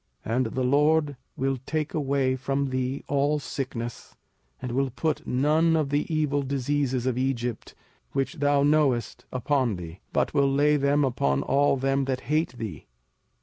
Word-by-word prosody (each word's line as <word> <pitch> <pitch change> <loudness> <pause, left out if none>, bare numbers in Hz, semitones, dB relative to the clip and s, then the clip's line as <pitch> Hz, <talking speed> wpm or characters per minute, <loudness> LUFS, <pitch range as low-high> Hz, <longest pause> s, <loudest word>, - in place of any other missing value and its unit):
05:007:015 115 - -1
And 130 0 +2
the 130 +3 -2
LORD 145 +2 +3 0.2
will 135 0 0
take 155 -1 -2
away 140 -3 +1
from 135 +1 -1
thee 130 +1 -2
all 145 +1 +1
sickness, 125 -5 -5 0.4
and 125 -1 -5
will 135 +2 +1
put 155 +5 -2
none 155 +5 +3
of 155 -3 +1
the 145 +3 0
evil 150 -2 +1
diseases 135 -1 -1
of 130 -1 0
Egypt, 125 -3 -2 0.4
which 135 +4 -2
thou 145 -1 +3
knowest, 145 -6 +1
upon 130 -3 0
thee; 85 0 -8
but - - 0
will 140 -1 +3
lay 145 +2 +3
them 145 0 +2
upon 70 - 0
all 140 0 +2
them 135 +1 +1
that 130 -1 -2
hate 155 -2 0
thee. 110 -4 -6
135 Hz, 160 wpm, -26 LUFS, 130-145 Hz, 0.4 s, LORD